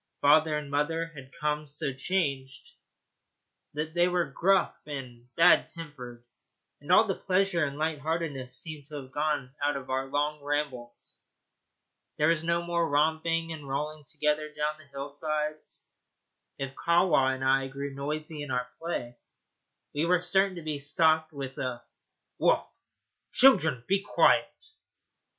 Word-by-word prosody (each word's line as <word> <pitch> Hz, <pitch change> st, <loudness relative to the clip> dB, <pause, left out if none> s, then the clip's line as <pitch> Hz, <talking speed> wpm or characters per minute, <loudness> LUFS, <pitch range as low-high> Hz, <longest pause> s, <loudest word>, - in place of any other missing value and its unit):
Father 150 Hz, +1 st, +4 dB
and 150 Hz, -2 st, -6 dB
mother 165 Hz, +3 st, 0 dB
had 135 Hz, -3 st, -11 dB
become 150 Hz, +1 st, -2 dB
so 140 Hz, -1 st, -3 dB
changed 135 Hz, -4 st, -2 dB, 1.0 s
that 155 Hz, +1 st, -3 dB
they 175 Hz, +1 st, +3 dB
were 180 Hz, -1 st, +1 dB
gruff 195 Hz, +2 st, +2 dB
and 125 Hz, -4 st, -7 dB
bad 170 Hz, +2 st, +6 dB
tempered; 125 Hz, -8 st, -9 dB, 0.6 s
and -, -, -5 dB
all -, -, +8 dB
the -, -, -1 dB
pleasure 185 Hz, -2 st, +1 dB
and 140 Hz, -1 st, -2 dB
light 155 Hz, -1 st, -1 dB
heartedness 145 Hz, -5 st, -2 dB
seemed 150 Hz, -2 st, -6 dB
to 150 Hz, -, -9 dB
have 135 Hz, -2 st, -8 dB
gone 145 Hz, -3 st, -1 dB
out 145 Hz, 0 st, +1 dB
of 130 Hz, -1 st, -7 dB
our 135 Hz, +1 st, -1 dB
long 145 Hz, +2 st, -1 dB
rambles. 140 Hz, -5 st, -4 dB, 1.0 s
There 150 Hz, +1 st, +3 dB
was 165 Hz, -1 st, +2 dB
no 170 Hz, +1 st, +1 dB
more 170 Hz, -1 st, 0 dB
romping 160 Hz, +3 st, +1 dB
and 145 Hz, -3 st, -9 dB
rolling 150 Hz, +2 st, -3 dB
together 150 Hz, +1 st, -1 dB
down 150 Hz, +1 st, -1 dB
the 155 Hz, -, -16 dB
hillsides. 150 Hz, +2 st, -4 dB, 0.7 s
If 135 Hz, 0 st, -4 dB
Kahwa 170 Hz, -6 st, +3 dB
and 130 Hz, -, -6 dB
I 135 Hz, 0 st, +3 dB
grew 140 Hz, +1 st, -5 dB
noisy 150 Hz, +2 st, -4 dB
in 145 Hz, -, -6 dB
our 125 Hz, -1 st, -1 dB
play, 120 Hz, -8 st, -4 dB, 0.7 s
we 150 Hz, +3 st, 0 dB
were 180 Hz, 0 st, +4 dB
certain 190 Hz, +2 st, +2 dB
to 170 Hz, -, -7 dB
be 155 Hz, -2 st, -3 dB
stopped 155 Hz, +2 st, +2 dB
with 135 Hz, -3 st, -6 dB
a 125 Hz, -2 st, -3 dB, 0.6 s
'Woof, -, -, +3 dB, 0.7 s
children! 170 Hz, -, +5 dB
be 195 Hz, +1 st, +2 dB
quiet.' 320 Hz, -, +2 dB
150 Hz, 145 wpm, -28 LUFS, 135-165 Hz, 1.0 s, all